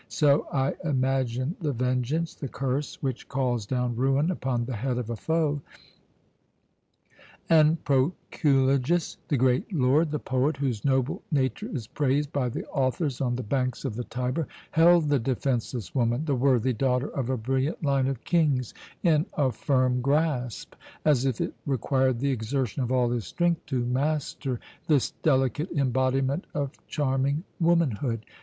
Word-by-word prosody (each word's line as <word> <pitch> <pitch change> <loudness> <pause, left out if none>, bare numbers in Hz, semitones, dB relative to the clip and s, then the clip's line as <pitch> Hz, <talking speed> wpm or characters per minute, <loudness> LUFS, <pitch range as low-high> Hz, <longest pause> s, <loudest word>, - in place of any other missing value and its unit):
So 145 -1 +3
I 135 0 +1
imagine 130 -1 0
the 150 -3 0
vengeance, 125 +6 -1
the 140 - -6
curse 135 +2 -3
which 130 -3 -3
calls 125 -5 -1
down 125 -1 -1
ruin 135 +7 +2
upon 130 -8 -1
the 125 -2 -4
head 125 +2 -1
of 120 -2 -3
a - - -2
foe. 155 +2 0 1.9
And 160 0 +5
Proculejus, 140 +1 +1
the 145 - +1
great 130 - +2
lord, 150 0 +3
the 150 - -1
poet 140 +2 0
whose 130 -7 -2
noble 130 0 +1
nature 130 -5 0
is 120 -5 -4
praised 145 +3 0
by 130 -3 0
the - - -5
authors 135 +1 -1
on 125 -2 0
the 125 - -3
banks 130 +3 -1
of 130 - -2
the 125 - -3
Tiber, 125 +6 -2 0.2
held 165 -1 +5
the 145 -2 +3
defenceless 120 -4 -2
woman, 120 +3 +1
the 145 - +1
worthy 130 -1 +2
daughter 125 +3 0
of 130 -3 -3
a 130 - 0
brilliant 130 +8 -1
line 135 -2 +2
of 135 -3 -3
kings, 145 -8 +1 0.3
in 155 -2 +3
a 135 -4 +2
firm 130 -1 +1
grasp, 140 -4 0 0.3
as 140 -4 +3
if 130 -4 0
it - - -2
required 130 -1 +1
the 140 +3 0
exertion 130 +2 -2
of 125 -1 -2
all 125 -2 +2
his 120 -3 -2
strength 175 -1 0
to 130 -4 -1
master 135 -1 -1 0.3
this 145 -5 +2
delicate 145 +3 +1
embodiment 135 +2 +1
of 140 -2 -1 0.2
charming 140 +1 0 0.2
womanhood. 140 - +1
135 Hz, 155 wpm, -27 LUFS, 125-145 Hz, 1.9 s, And